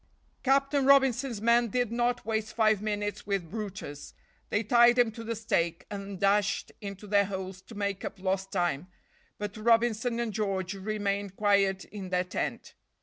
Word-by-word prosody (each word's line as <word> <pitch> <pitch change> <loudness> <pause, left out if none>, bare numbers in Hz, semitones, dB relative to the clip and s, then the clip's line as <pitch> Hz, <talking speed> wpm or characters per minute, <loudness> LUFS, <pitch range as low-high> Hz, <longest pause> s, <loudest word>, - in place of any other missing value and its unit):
Captain 275 +1 +2
Robinson's 265 -4 +3
men 235 +1 +4
did 245 +1 -1
not 240 +1 0
waste 220 0 -2
five 215 -3 +3
minutes 205 -1 -3
with 195 -5 -2
brutus. 200 -9 -6 0.3
They 210 - +1
tied 240 +2 +5
him 240 -2 +4
to 230 +1 -8
the 230 +1 -3
stake, 170 -7 -1
and 200 -2 -6
dashed 200 +1 +1
into 200 0 -7
their 200 0 +3
holes 190 -1 -6
to 225 - -13
make 200 -1 -2
up - - -5
lost 190 0 -1
time, 175 -4 -1 0.5
but 205 -1 -5
Robinson 230 +1 +2
and 235 -3 -2
George 195 -3 -1
remained 200 -1 -2
quiet 200 -2 +2
in 195 -3 -8
their 180 0 +1
tent. 180 - -4
205 Hz, 160 wpm, -29 LUFS, 195-230 Hz, 0.5 s, tied